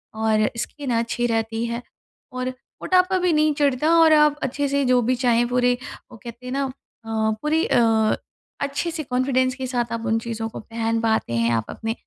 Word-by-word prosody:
और 220 -1 +2
स्किन 270 +4 -4
अच्छी 235 +1 -1
रहती 225 0 -1
है 235 +1 -3 0.6
और 255 0 -1
मोटापा 365 +8 0
भी 360 -1 +2
नहीं 305 0 +3
चढ़ता 290 0 +1
और 320 -1 +6
आप 300 -1 +4
अच्छे 280 +2 -1
से 280 0 +1
जो 250 -1 +4
भी 250 +2 +1
चाहें 240 -1 +2
पूरे 245 0 +2 0.3
वो 235 - -11
कहते 235 +1 -10
हैं 250 - -4
ना 275 - 0
अ, 260 - -4 0.7
पूरी 315 +2 +1
अ, 225 -2 +3 0.5
अच्छे-से 310 +3 -2
कॉन्फिडेंस 255 0 0
के 260 -1 -4
साथ 240 -2 -2
आप 230 0 -4
उन 225 0 +2
चीज़ों 225 -1 -4
को - - -8
पहन 225 0 -2
पाते 220 - 0
हैं 115 0 +1
आप 115 - -1
अपने 225 0 -3
250 Hz, 190 wpm, -23 LUFS, 225-280 Hz, 0.7 s, और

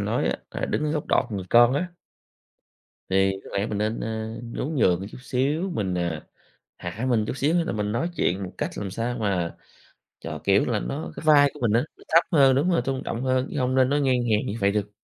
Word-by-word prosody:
nói - - 0
á, - - 0
là - - -3
đứng 150 - -1
ở 150 - 0
góc 150 -2 -2
đọt - - +3
người 95 -2 -3
con 120 +1 +7
á 175 +5 -2 1.2
Thì 95 +1 +3
có - - -11
lẽ 100 - 0
mình 105 -2 -3
nên, 110 +2 -1
a, 110 0 -4
nhún 125 +6 -4
nhường 90 -8 +3
một 95 - -5
chút - - -10
xíu, 140 +8 -1
mình 95 -9 -1
à, 85 -3 -3 0.5
hạ 105 +9 -5
mình 115 -4 +2
chút - - -3
xíu, 145 +4 +1
xong 170 -1 +2
là - - -1
mình 105 -1 -2
nói 125 +10 -1
chuyện 95 +3 0
một 95 - -6
cách - - -1
làm 100 -2 -4
sao 115 +4 -3
mà 95 -6 -1 0.6
cho, - - -6
kiểu - - +3
là, - - 0
nó 70 +6 -4
cái - - -8
vai 145 -2 +6
của - - -12
mình 120 -4 +1
á, 115 - +3
nó - - -17
thấp 165 +2 +5
hơn 135 -4 +5
đúng 145 +7 +2
rồi, 170 - +2
tôn 135 -1 -2
trọng 115 +2 -3
hơn, 130 0 +1
chứ 150 - -2
hông 130 0 0
nên 130 -1 +4
nói 145 +1 +2
ngang 130 -2 +3 0.2
hàng 105 - +2
như 105 - -3
vậy 100 0 +3
được. 105 0 -2
120 Hz, 250 wpm, -25 LUFS, 100-135 Hz, 1.2 s, con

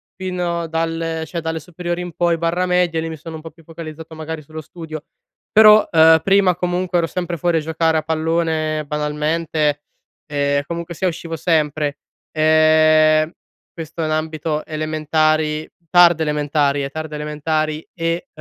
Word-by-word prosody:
fino 180 -2 -3
dalle 165 0 -2
cioè, 170 +2 -5
dalle 160 0 -3
superiori 175 +1 -5
in 175 -1 -7
poi 170 0 +1
barra, 170 +2 0
medie, 180 -2 +1
lì 165 - -4
mi 160 - -6
sono 160 +2 -9
un - - -11
po' 165 - -9
più 165 - -21
focalizzato 160 0 -9
magari 160 0 -6
sullo 155 +2 -8
studio. 155 -1 -9 0.5
Però, 215 0 +7
ehm, 160 -1 +6
prima 195 -2 +4
comunque 180 0 -1
ero 170 - +2
sempre 175 0 -4
fuori 170 +1 +1
a - - +2
giocare 160 +1 0
a - - +1
pallone 160 -1 -1
banalmente, 150 0 -1 0.4
ehm, 140 -1 0
comunque 170 +2 -5
sia 185 - 0
uscivo 165 -1 -4
sempre. 150 -3 0 0.3
Ehm, 155 0 +4 0.4
questo 165 0 -6
in 155 - -1
ambito 155 0 -2
elementari, 155 0 0 0.2
tarde 175 -2 +6
elementari, 145 -1 0
ehm, 135 - -3
tarde 155 +2 -6
elementari 155 +1 -2
e 165 0 -2
160 Hz, 155 wpm, -19 LUFS, 155-170 Hz, 0.5 s, Però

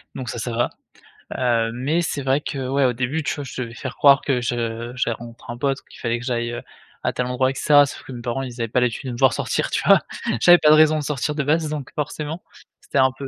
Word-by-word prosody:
Donc 130 -3 -5
ça, 120 - -5
ça 120 - -3
va. 115 +1 0 0.7
Heu, 115 -3 +1
mais 140 +8 0
c'est 150 -4 -2
vrai 135 +2 +1
que 135 -3 -4
ouais 135 +1 +2
au 125 - +2
début, 130 +6 -2
tu 145 - -1
vois, 145 - -5
je 130 -1 -6
devais 115 -1 -6
faire 130 +2 -6
croire 140 -1 +6
que 130 -3 0
je 115 0 -3
j'avais 115 -3 0
rencontrer 120 0 -10
un - - -10
pote, 135 +2 -1
qu'il - - -14
fallait 120 -1 -1
que 120 - -8
j'aille, 120 -1 -2 0.4
à - - 0
tel 125 - -1
endroit, 125 +1 +1
et - - -6
cetera, 145 -1 +5
sauf - - -8
que - - -11
mes 120 - -7
parents, 120 +2 -2
ils 120 -2 -6
avaient 115 - 0
pas 120 - +1
l'habitude 125 +3 -1
de - - -4
me 120 - -6
voir 130 -2 +5
sortir, - - -1
tu - - 0
vois? - - +7 0.4
J'avais 175 0 +8
pas 155 - +4
de 155 - +8
raison 155 0 +5
de - - -4
sortir 150 0 -2
de 150 - -1
base, 155 +2 +1
donc 150 -4 -5
forcément, 150 +2 -4 0.4
c'était - - -4
un 130 0 +5
peu 135 - -6
130 Hz, 270 wpm, -22 LUFS, 120-145 Hz, 0.7 s, J'avais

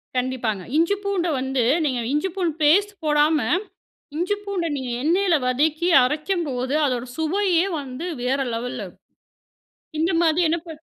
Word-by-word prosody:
கண்டிப்பாங்க. 245 -6 -1
இஞ்சி, 335 +5 +3
பூண்ட 395 -3 0
வந்து 265 -1 0 0.2
நீங்க 260 -4 0
இஞ்சி 300 +6 0
பூண்டு 350 -5 0
பேஸ்ட் 395 +8 +4
போடாம, 300 +1 +3 0.8
இஞ்சி 365 +5 0
பூண்ட 390 -4 -2
நீங்க 260 -2 -4
எண்ணெயில 350 +3 +3
வதக்கி 305 +6 +1
அரைக்கும்போது 295 -2 -1
அதோட 250 -3 -1
சுவையே 350 +2 +1
வந்து 275 +4 -6 0.2
வேற 260 +2 0 0.2
லெவல்ல, 240 +2 -4 1.2
இந்த 330 +4 +2
மாரி 330 +1 +3
என்ன 335 - +1
பண்ணணும். 320 -2 -9
310 Hz, 130 wpm, -23 LUFS, 260-350 Hz, 1.2 s, பேஸ்ட்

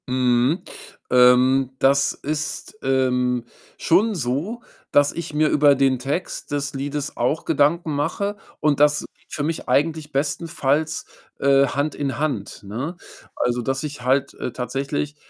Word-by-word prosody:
Mhm. 125 +4 +2 0.5
Ähm, 125 +1 +5
das 140 +1 +3
ist, 155 +7 -4
ähm, 125 -2 +1 0.3
schon 205 +6 +2
so, 160 - -2 0.3
dass 145 0 +4
ich 170 -2 -6
mir 150 0 +2
über 145 -1 +5
den 135 -2 +2
Text 140 +5 -4
des 140 -1 -2
Liedes 145 +1 -4
auch 155 - 0
Gedanken 155 +2 +2
mache 190 +8 -1 0.2
und 150 -2 +1
das 150 0 +4
geht - - -32
für 145 - -2
mich 160 +2 -3
eigentlich 155 0 +1
bestenfalls, 150 +1 -1 0.3
äh, 140 0 +4
Hand 145 +3 -2
in 135 -4 -3
Hand, 135 -12 -3
ne? 125 - -5 0.4
Also, 125 0 0
dass 135 +4 -2
ich 145 -3 -6
halt, 130 +2 +1
äh, - - -4
tatsächlich, 135 +4 -3
140 Hz, 140 wpm, -22 LUFS, 130-155 Hz, 0.5 s, Ähm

